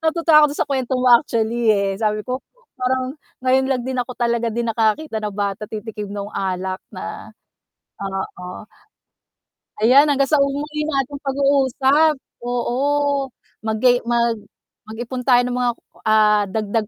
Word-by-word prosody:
Natutuwa 320 -2 +5
ako - - +6
dun - - -8
sa - - -34
kwento 260 -2 -1
mo 255 - -1
actually, 230 -2 +2
eh, 200 -1 0
sabi 215 -1 0
ko, 255 +1 -3 0.4
parang 255 +1 0 0.3
ngayon 260 +1 +3
lang 255 -3 0
din 260 -1 -3
ako 250 +1 -4
talaga 235 -1 0
din 235 +1 -2
nakakakita 225 +3 0
ng 210 -2 -4
bata 200 0 -2
titikim 215 -1 -6
nung 200 0 -5
alak 190 0 -3
na - - -7 0.7
oo. 190 -1 -6 1.2
Ayan, 275 +6 +6
hanggang 280 -1 +3
sa 300 - +4
muli 295 +2 -1
nating 280 -1 -2
pag-uusap, 280 +2 +2 0.3
oo. 275 +3 0 0.3
Magay 225 +3 +2
mag 235 -2 +1 0.5
mag-ipon 240 +3 -5
tayo 245 -1 +6
ng 250 - -2
mga 245 -1 +2 0.4
ah, 210 -1 +4
dagdag 215 +1 -2
245 Hz, 140 wpm, -20 LUFS, 215-275 Hz, 1.2 s, ako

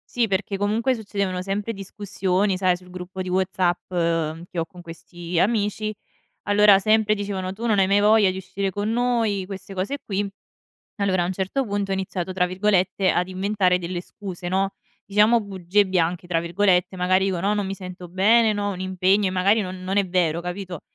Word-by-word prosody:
Sì, 235 -2 +2
perché 195 0 -1
comunque 225 +5 +1
succedevano 200 -5 -3
sempre 205 +4 -3
discussioni, 195 -1 -1
sai, 185 -1 +2
sul 180 0 -16
gruppo 185 +1 -6
di 185 - -5
WhatsApp, 185 -1 0 0.6
che 175 - -5
ho 165 - 0
con 180 - -13
questi 170 +1 -5
amici, 215 0 0 0.6
allora 205 -1 +6
sempre 215 +1 +3
dicevano: 195 -2 -3
"Tu 230 +4 -4
non 215 - +2
hai 195 - +5
mai 200 +1 +3
voglia 210 -2 +5
di 185 - -6
uscire 195 +1 -3
con 205 +3 -2
noi," 230 -5 +1
queste 195 0 -8
cose 195 +10 -2
qui. 200 0 -2 0.8
Allora 185 -3 +2
a - - 0
un 185 - -2
certo 195 +9 -1
punto 200 -1 -2
ho - - +1
iniziato 190 -1 -3
tra 180 -1 +1
virgolette 190 0 +1
ad 180 +1 0
"inventare 190 -1 +1
delle 175 0 -4
scuse", 185 -1 -7
no, 195 +2 +1 0.3
diciamo 210 +4 +4
"bugie 195 0 +1
bianche" 175 -1 0
tra 165 -2 0
virgolette, 180 +1 +1
magari 185 +1 +2
dico: 185 -3 -1
"No, 200 +3 +1
non 205 -2 -1
mi 195 - -3
sento 180 -1 -9
bene, 215 +5 +4
no, 205 0 -1
ho 200 - -1
un 185 - -7
impegno" 190 +2 +2
e - - +1
magari 190 +4 +3
no 185 -3 -3
non 185 +2 -2
è 195 -2 +1
vero, 170 -2 +1
capito? 180 -1 -6
190 Hz, 195 wpm, -23 LUFS, 185-205 Hz, 0.8 s, allora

